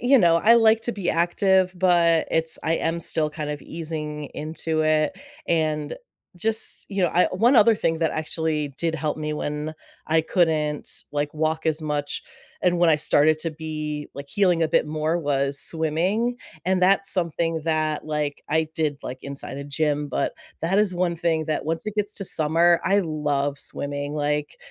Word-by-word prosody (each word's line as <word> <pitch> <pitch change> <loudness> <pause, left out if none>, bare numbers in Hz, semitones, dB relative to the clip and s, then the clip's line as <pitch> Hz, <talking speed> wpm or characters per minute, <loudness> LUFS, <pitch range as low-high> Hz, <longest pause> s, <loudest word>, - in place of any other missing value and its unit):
you 255 +2 +5
know, 170 -4 +5
I 220 +7 +5
like 225 -1 +5
to 240 - -2
be 195 -5 -2
active, 185 +2 +2
but 170 -2 +3
it's 160 0 0
I 165 - +1
am 165 +1 -1
still 160 -2 0
kind 150 -1 -5
of 150 -2 -5
easing 155 -2 -5
into 155 +1 -3
it, 155 -1 +2 0.3
and 155 -2 0 0.4
just, 220 +5 0
you 195 -2 -1
know, 175 - +2
I 180 - +4
one 235 +8 +3
other 225 +1 +6
thing 165 -6 -1
that 165 -1 +1
actually 155 -1 -2
did 165 -1 -1
help 155 -1 -2
me 150 0 -3
when 150 +1 -4 0.3
I 160 0 +2
couldn't, 155 -4 0 0.2
like, 145 0 -1
walk 155 +1 -1
as 160 0 0
much, 145 -1 -3 0.4
and 175 -1 +2
when 175 -1 +4
I 155 - +5
started 155 +1 +3
to 165 - -2
be, 155 -1 -5
like, 140 0 -8
healing 180 -4 +2
a 160 - +2
bit - - +2
more 155 +2 -1
was 140 -2 0
swimming, 180 +10 +1 0.3
and 185 +1 +1
that's 195 +1 +4
something 165 -2 0
that, 155 -1 0
like, 150 -2 -2
I 160 +1 +1
did, 150 -3 -1
like, 130 +1 -6
inside 140 0 -6
a 140 - -6
gym, 145 +1 -1
but 130 - -1 0.3
that 180 +4 +2
is 210 -3 +2
one 175 -1 0
thing 160 -1 0
that 155 0 -2
once 165 0 -1
it 215 - -3
gets 210 0 -1
to 200 - -5
summer, 165 +1 +3
I 195 +3 +3
love 145 -4 -1
swimming, 145 +1 -4
like, 150 0 -1
160 Hz, 185 wpm, -24 LUFS, 150-175 Hz, 0.4 s, other